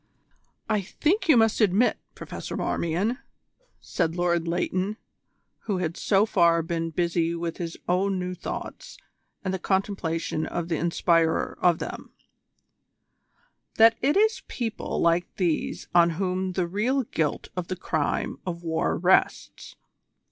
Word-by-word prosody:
"I 210 - +1
think 335 - -1
you 290 - +7
must 225 0 +3
admit, 210 +4 +3 0.2
Professor - - -6
Marmion," 190 - -1 0.6
said 165 0 -2
Lord 175 -1 +1
Leighton, 185 +4 -1 0.7
who 200 -4 -1
had 170 -2 -2
so 200 0 +2
far 170 -5 +3
been 165 0 -2
busy 170 0 0
with 170 -1 -4
his 165 -2 -5
own 190 +2 +1
new 180 0 -3
thoughts - - -7 0.5
and 185 - -1
the 190 - -2
contemplation 175 -5 -1
of 170 -1 -4
the 165 - 0
inspirer 165 0 +1
of 175 -2 +4
them, - - -7 1.6
"that 225 +1 +7
it 290 +7 +2
is 440 +2 +3
people 225 -3 -3
like 170 +1 +1
these 175 -5 -1
on 170 -1 +6
whom 185 0 -1
the 180 -1 0
real 225 +10 0
guilt 160 -9 -2
of 180 -2 -3
the 185 - -3
crime 155 -4 -2
of 175 -2 -5
war 160 -1 0
rests. 180 +2 +1
180 Hz, 135 wpm, -26 LUFS, 170-205 Hz, 1.6 s, you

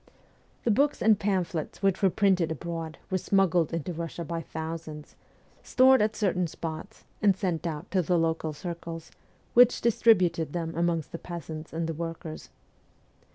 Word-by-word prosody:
The 235 - +2
books 285 +7 +2
and 215 -2 +4
pamphlets 185 -4 -2
which 195 -1 +2
were 195 - +5
printed 185 -4 +2
abroad 165 +1 -5
were 185 - +1
smuggled 180 -4 +2
into 165 +1 -3
Russia 170 +1 -5
by 165 +1 -3
thousands, 160 -1 -7 0.5
stored 260 0 +5
at 215 +1 +1
certain 180 -4 +1
spots, 165 +6 -7 0.2
and 200 -3 +4
sent 175 -4 -1
out 160 +3 -6
to 190 - +3
the 175 +1 +1
local 160 -1 0
circles, 165 +1 -7 0.4
which 245 0 +6
distributed 185 -9 +3
them 165 -2 -3
amongst 170 -2 0
the 170 - -6
peasants 160 -2 -7
and 165 +1 -2
the 165 - -2
workers. 165 0 -6
170 Hz, 155 wpm, -28 LUFS, 160-195 Hz, 0.5 s, which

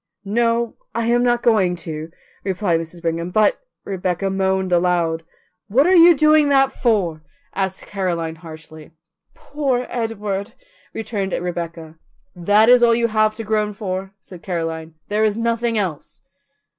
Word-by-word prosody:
"No, 230 +2 0 0.2
I 230 - 0
am 240 +1 +2
not 240 -1 +1
going 200 -7 +3
to," 155 -1 -6 0.3
replied 185 -3 0
Mrs. 165 +1 -8
Brigham; 170 +1 -2
"but 210 +3 +2
" - - -56
Rebecca 190 0 -2
moaned 190 -1 0
aloud. 170 -2 +1 0.5
"What 250 +8 +3
are 365 - +4
you 340 -2 +7
doing 305 0 +4
that 270 -1 +4
for?" 190 -10 0 0.3
asked 190 -1 -3
Caroline 170 -5 -3
harshly. 155 -1 -12 0.4
"Poor 275 -4 -2
Edward," 210 -4 -3 0.4
returned 205 -4 -4
Rebecca. 170 -2 -5 0.4
"That 205 +5 +3
is 250 0 +7
all 235 -1 +5
you 235 0 +1
have 215 0 +2
to 225 - -6
groan 210 -1 -1
for," 195 -1 -5
said 180 -2 -13
Caroline. 165 -3 -4
"There 210 +1 +1
is 215 -1 +1
nothing 230 0 0
else." 180 -8 -4
195 Hz, 145 wpm, -20 LUFS, 175-230 Hz, 0.5 s, you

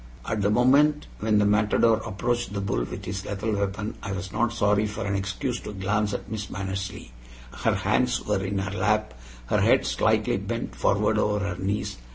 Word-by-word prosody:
At 110 -2 -1
the 100 - +2
moment 140 +7 +4
when 110 0 +2
the 105 - +4
matador 105 +2 +3
approached 115 +2 -2
the 100 - -2
bull 95 -11 -1
with - - -7
his 95 +1 -4
lethal 105 +2 -2
weapon 100 +1 -3
I 100 - -4
was 95 0 -5
not 120 0 +1
sorry 105 -2 +2
for 105 0 -4
an 100 - -1
excuse 100 +5 -2
to 105 - -7
glance 105 +2 0
at - - -6
Miss 110 -1 -5
Mannersley. 95 -8 -5 0.4
Her - - 0
hands 125 -1 +1
were 100 -2 0
in 100 +1 -2
her 95 0 -2
lap, 105 0 +1 0.3
her - - +1
head - - +4
slightly - - +2
bent - - -4
forward - - +2
over 105 -1 +1
her 90 - -3
knees. 100 +2 -2
105 Hz, 195 wpm, -26 LUFS, 100-110 Hz, 0.4 s, moment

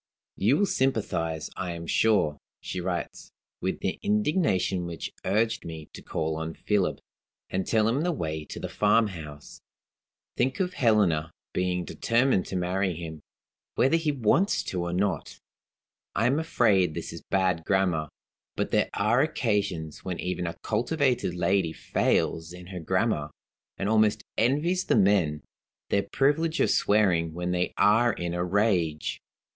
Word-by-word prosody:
"You 115 +9 +3
will 205 - +3
sympathize, 85 - -1
I 90 -2 -3
am 85 0 -7
sure" 85 -7 +2 0.2
(she 90 - -5
writes), 90 -1 -4 0.3
"with 95 - -2
the 95 - -2
indignation 150 - +1
which 85 -1 -6
urged 110 +3 +1
me 80 -2 -8
to - - -9
call 80 0 -2
on 80 0 -4
Philip, 105 -3 0 0.5
and 95 0 -1
tell 110 -1 +3
him 125 +6 +1
the 175 +2 +1
way 80 - -3
to - - -8
the - - -4
farmhouse. 95 -9 -1 0.7
Think 130 +2 0
of 185 -1 0
Helena 100 - +2 0.2
being 90 -1 0
determined 115 -4 +1
to - - -5
marry 90 0 0
him, 80 -2 -7 0.5
whether 135 +5 +3
he 165 -2 +1
wants 145 - +2
to 90 - -3
or 85 0 -2
not! 95 +3 -1 0.8
I 110 - +2
am 135 +5 +3
afraid 105 - +2
this - - -5
is - - -8
bad 95 -4 0
grammar. 90 -5 +1 0.5
But - - -2
there - - +2
are 110 +5 +3
occasions 100 - -1
when 90 -2 -4
even 90 -1 -2
a 85 0 -5
cultivated 125 - 0
lady 90 -1 +1
fails 80 +1 0
in 90 0 -10
her 90 - -4
grammar, 95 -3 0 0.5
and 95 - -2
almost 110 -1 +3
envies 155 +10 +1
the - - +2
men 95 - +3 0.5
their 100 - +3
privilege 155 - +1
of - - +3
swearing 90 -6 +2
when 90 +1 -2
they 90 0 0
are 115 +3 +4
in 85 -4 -4
a 90 0 -1
rage. 90 -5 0
95 Hz, 150 wpm, -27 LUFS, 85-115 Hz, 0.8 s, are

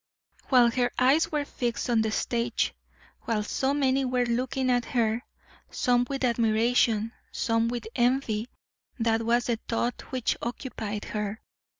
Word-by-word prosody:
While 245 -3 +6
her 245 0 +1
eyes 270 +6 +3
were 295 -2 0
fixed 240 -4 -3
on 235 -2 +3
the 220 - 0
stage, 235 +2 0 0.5
while 215 -2 0
so 265 +5 0
many 270 -1 +2
were 250 -1 +1
looking 255 +2 0
at 245 -1 +2
her, 230 -1 0 0.5
some 245 0 +1
with 275 -1 -3
admiration, 230 -1 +2 0.2
some 230 0 +1
with 235 -1 -3
envy, 240 -3 +1 0.5
that 225 -1 +1
was 235 +1 +2
the 235 -2 -1
thought 235 +1 -2
which 255 -3 0
occupied 225 -4 -4
her. 210 0 -3
240 Hz, 140 wpm, -27 LUFS, 225-255 Hz, 0.5 s, While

